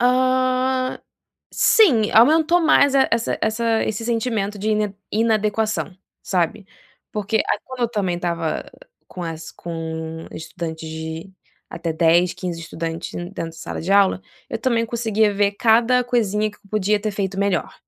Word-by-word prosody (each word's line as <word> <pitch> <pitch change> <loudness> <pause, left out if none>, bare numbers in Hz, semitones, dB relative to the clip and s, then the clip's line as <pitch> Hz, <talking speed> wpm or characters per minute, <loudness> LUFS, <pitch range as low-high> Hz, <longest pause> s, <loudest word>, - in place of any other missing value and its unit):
Ah, 255 +1 +1 0.5
sim, 255 - +4
aumentou 315 +9 +5
mais 285 -4 +4
e - - +5
essa 230 0 0
essa 225 +1 +1
esse 220 +1 -3
sentimento 225 -3 -1
de 215 +2 -1
in 210 -2 0 0.2
inadequação, 215 -2 0 0.3
sabe, 185 +2 -1 0.5
porque 215 +1 -1
a - - 0
quando 260 -1 -9
eu 240 - +2
também 195 -6 -1
estava 170 -2 -2 0.4
com 180 - -7
as 165 -1 -6
com 160 -1 -6
estudantes 160 -1 -6
de 160 +3 -6 0.4
até 170 -1 -4
10, 170 +2 +3
15 175 -2 -5
estudantes 165 0 -5
dentro 175 +3 -6 0.2
da - - -17
sala 165 - -6
de 175 - -4
aula, 200 -1 +4 0.3
eu - - -3
também 235 -3 +1
conseguia 220 -2 +1
ver 200 0 +2
cada 235 +4 +3
coisinha 215 -3 0
que 205 - -20
podia 210 0 +1
ter 215 +1 -2
feito 195 -1 -3
melhor, 200 0 0
210 Hz, 150 wpm, -21 LUFS, 175-235 Hz, 0.5 s, aumentou